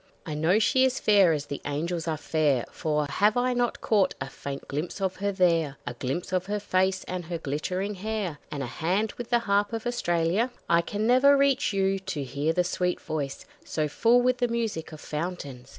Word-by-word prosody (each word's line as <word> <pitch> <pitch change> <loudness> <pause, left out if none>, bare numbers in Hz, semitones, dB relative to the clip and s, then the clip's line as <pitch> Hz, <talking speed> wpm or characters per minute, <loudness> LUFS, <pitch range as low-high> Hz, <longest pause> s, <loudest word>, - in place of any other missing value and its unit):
I 155 - -4
know 160 +6 +3
she 255 +4 +3
is 260 0 +2
fair 200 -5 +5
as 150 -2 -1
the 140 - -6
angels 165 +4 -2
are 160 -1 0
fair, 150 -5 +1
For 150 -2 -1
have 205 - +2
I 250 +1 +2
not 245 -1 -1
caught 205 -4 +2
a 135 - -4
faint 140 -1 -7
glimpse 150 +8 -4
of 190 -1 -1
her 200 +1 -1
there; 165 -7 +2
A 125 - -4
glimpse 135 +9 -4
of 185 0 0
her 210 +1 -1
face 190 -1 +1
and 180 -2 -5
her 170 +1 -3
glittering 180 +7 -2
hair, 200 -5 -3
And 140 -2 -4
a - - -2
hand 185 - -1
with 240 - -5
the 240 - +4
Harp 205 +2 +2
of 225 0 -3
Australia? 185 -1 +1 0.2
I 170 0 +4
never 250 +6 +5
can - - +5
reach 275 -3 +2
you, 195 -1 +1
to 155 -6 -4
hear 140 +4 -1
the 180 +2 +2
sweet 180 0 -1
voice 145 -3 -4 0.2
So 155 -1 -1
full 235 +10 +3
with 250 0 +2
the 245 - +2
music 225 -9 -2
of 155 - -9
fountains! 150 -6 -5
180 Hz, 210 wpm, -27 LUFS, 155-215 Hz, 0.2 s, fair